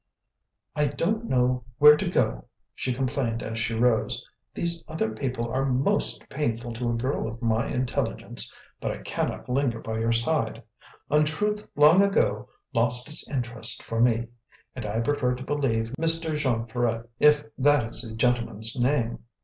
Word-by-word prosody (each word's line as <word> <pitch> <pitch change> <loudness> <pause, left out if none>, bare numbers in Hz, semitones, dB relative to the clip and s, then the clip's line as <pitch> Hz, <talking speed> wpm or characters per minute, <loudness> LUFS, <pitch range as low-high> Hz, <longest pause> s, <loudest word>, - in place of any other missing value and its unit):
"I 150 - +2
don't 220 +10 -1
know 125 - +1
where 150 +1 +9
to - - -2
go," - - 0 0.3
she 130 - -2
complained 125 -2 -1
as 115 0 -4
she 110 +1 -1
rose. 115 -1 +1 0.2
"These 170 -1 -2
other 155 -8 -2
people 120 0 -3
are 130 +2 0
MOST 130 0 0
painful 120 -4 -2
to 120 +1 -2
a 120 - 0
girl 130 +3 -1
of 115 +1 -7
my 115 -1 +1
intelligence, 125 0 -2 0.3
but - - -2
I - - -5
cannot - - -3
linger 125 -2 0
by 110 0 -4
your 115 +1 +1
side; 115 +7 +1 0.5
untruth 160 +8 +1
long 150 +6 +7
ago 200 0 +1 0.2
lost 125 +3 +2
its 150 - -3
interest 120 -4 -1
for 115 0 -2
me, 120 -1 +3 0.5
and 120 -4 -5
I 110 +2 -1
prefer 125 0 0
to 125 - -7
believe 120 -6 -1
Mr. 165 -1 +2
Jean 125 -6 0
Ferret 115 0 -1
if 150 0 +5 0.2
that 145 -2 +4
is - - 0
the 110 -3 -7
gentleman's 115 -2 0
name. 120 -2 0
125 Hz, 160 wpm, -26 LUFS, 115-145 Hz, 0.5 s, where